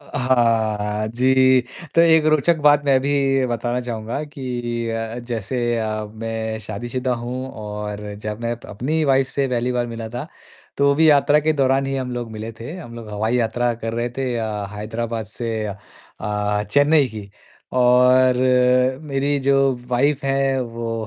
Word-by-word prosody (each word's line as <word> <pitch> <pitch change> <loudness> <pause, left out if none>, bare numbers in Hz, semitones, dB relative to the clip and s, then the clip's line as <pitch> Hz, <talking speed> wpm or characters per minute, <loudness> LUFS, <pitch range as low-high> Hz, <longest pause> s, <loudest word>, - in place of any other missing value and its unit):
अ, 145 - -18
हाँ। 110 -4 +1
जी, 130 +2 +4 0.3
तो 165 - +5
एक 160 -2 +5
रोचक 155 +2 +3
बात 145 0 +5
मैं 135 -2 +4
भी 135 -1 +1
बताना 120 +1 -2
चाहूँगा 120 +2 -4
कि 120 -5 -4
अ, 115 +1 -4
जैसे 120 0 -4 0.2
अ, 110 -1 -2
मैं 110 0 -4
शादीशुदा 120 +4 -2
हूँ 125 +2 -5
और 105 -1 -6
जब 105 +1 -4
मैं 115 - -1
अप 120 - -9
अपनी 125 +9 -4
ही 160 - +2
वाइफ़ 135 -1 +3
से 140 -1 -1
पहली 125 0 -1
वाल 120 -1 0
मिला 115 -1 -6
था, 120 +5 -6 0.5
तो 140 0 +3
भी 160 +2 +4
यात्रा 145 +1 +4
के 155 +1 +2
दौरान 135 -1 +2
ही 135 - -2
हम 130 -1 -3
लोग 120 -2 -4
मिले 110 +1 -6
थे। 120 +7 -6
हम 135 -10 -9
लोग 115 -2 -9
हवाई 110 +3 0
यात्रा 120 +1 +1
कर 115 - -2
रहे 120 +1 -1
थे 130 -2 -1
अ, 105 -3 -3
हैदराबाद 115 +1 -4
से 115 -2 -2
अ 100 - -4 0.5
अ, 105 0 -1
चेन्नई 145 +1 +4
की 105 -3 -9 0.5
और 125 +1 +5 0.7
मेरी 140 -1 0
जो 140 +1 +2 0.4
वाइफ़ 140 +3 +1
हैं 135 0 +1
वो 115 -2 -4
120 Hz, 170 wpm, -21 LUFS, 110-135 Hz, 0.7 s, तो